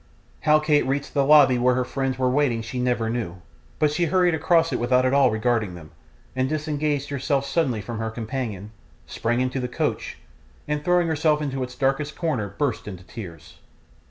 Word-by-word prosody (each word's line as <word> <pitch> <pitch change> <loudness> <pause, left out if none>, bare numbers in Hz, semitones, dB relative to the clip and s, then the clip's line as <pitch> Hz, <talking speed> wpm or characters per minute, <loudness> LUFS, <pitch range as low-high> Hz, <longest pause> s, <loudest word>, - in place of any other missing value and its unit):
How 155 0 +4
Kate 155 -1 +2
reached 140 +1 -2
the 140 - +2
lobby 135 -3 +6
where 125 +1 +3
her 125 0 0
friends 135 0 -2
were 130 -1 +1
waiting 125 -4 +1
she 125 +3 -5
never 125 -2 0
knew, 110 -7 -3 0.4
but 150 -1 +2
she 170 +3 +1
hurried 180 +1 +2
across 165 +1 +2
it - - -1
without 125 +1 +2
at 130 - +1
all 140 0 +5
regarding 110 -3 0
them, 75 -3 -12 0.4
and 130 0 0
disengaged 150 -2 -1
herself 140 0 -1
suddenly 135 -6 0
from 115 +2 -6
her 110 0 -2
companion, 110 -3 -5 0.3
sprang 120 +2 -1
into 130 +1 -1
the 125 - -2
coach, 125 - -3 0.5
and 150 0 -2
throwing 175 +1 +2
herself 155 -1 +2
into 135 -3 -3
its 125 0 -5
darkest 135 +2 -1
corner 125 - -2
burst 145 -7 -1
into 95 -3 -8
tears. 90 -6 -10
130 Hz, 185 wpm, -24 LUFS, 120-150 Hz, 0.5 s, lobby